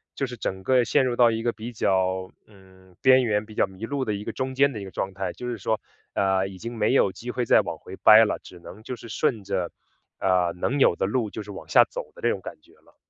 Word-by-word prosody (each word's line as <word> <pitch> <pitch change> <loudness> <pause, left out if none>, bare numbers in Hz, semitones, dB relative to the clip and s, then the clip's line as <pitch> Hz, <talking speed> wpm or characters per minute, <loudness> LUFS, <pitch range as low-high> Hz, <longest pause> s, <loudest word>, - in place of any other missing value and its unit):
就 135 - -1
是 125 -2 -7
整 95 -4 -4
个 125 +2 +3
陷 135 +2 +2
入 120 -1 0
到 120 -1 +5
一 115 0 -2
个 120 - 0
比 115 +2 -7
较， 95 -3 0 0.2
嗯， 95 -2 -20
边 130 0 +6
缘 105 -2 0
比 110 - -13
较 100 - +1
迷 95 +3 -8
路 140 +2 -2
的 105 -4 -1
一 100 - -6
个 - - -4
中 130 0 -3
间 140 +1 +3
的 105 - -6
一 - - -6
个 95 - -8
状 95 +1 -4
态。 95 0 -3
就 125 - -7
是 120 -3 -4
说， 110 +3 -1 0.4
呃， 95 -1 +2
已 95 -1 -10
经 115 +5 -7
没 110 +3 +1
有 100 - +4
机 115 +6 -9
会 125 0 -2
再 - - +5
往 - - -5
回 95 - -10
掰 110 +1 +8
了， - - -2
只 90 - -14
能 95 +5 -12
就 125 +3 -6
是 115 -1 -12
顺 110 -1 0
着， 95 -3 -2 0.5
呃， 90 -2 +2
能 140 +8 0
有 110 - +5
的 - - -1
路 110 +1 -1
就 110 +1 -7
是 105 - -10
往 100 - -10
下 - - +7
走 75 - -7
的 - - -13
这 120 - +3
种 95 - -4
感 - - -9
觉 - - -23
了。 - - -25
110 Hz, 300 characters per minute, -25 LUFS, 95-120 Hz, 0.5 s, 掰